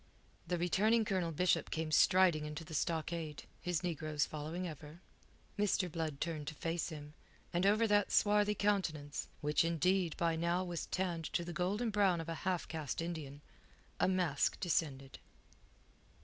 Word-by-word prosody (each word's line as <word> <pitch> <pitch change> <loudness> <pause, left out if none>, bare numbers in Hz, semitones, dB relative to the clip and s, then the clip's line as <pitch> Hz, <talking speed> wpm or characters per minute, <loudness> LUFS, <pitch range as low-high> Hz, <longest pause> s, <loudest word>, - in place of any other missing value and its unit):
The 175 +1 0
returning 210 +6 +3
Colonel 185 -4 0
Bishop 180 +4 +1
came 160 -1 -2
striding 175 -1 +5
into 150 +2 -6
the 160 - -9
stockade, 160 -3 -2 0.2
his 180 -2 -1
negroes 155 -4 -1
following 155 +4 -4
ever. 155 +1 -9 0.6
Mr. 195 -3 +1
Blood 155 -3 -3
turned 155 -3 -3
to 155 - -4
face 165 +2 -2
him, 150 -1 -8 0.4
and 175 +3 +2
over 215 +3 +4
that 205 -1 +3
swarthy 210 0 +3
countenance 170 -9 -1
which, 150 +2 +2
indeed, 170 +1 +1
by 165 -1 +1
now 170 +2 +1
was 175 -2 -4
tanned 175 -3 -2
to 170 - 0
the 175 - -5
golden 205 +8 0
brown 195 -4 +3
of 165 0 -5
a - - -1 0.2
half 180 -2 -1
caste 155 -4 -4
Indian 155 -4 -5 0.6
a - - +3
mask 180 -6 +1
descended. 140 -7 -1
170 Hz, 155 wpm, -35 LUFS, 155-185 Hz, 0.6 s, striding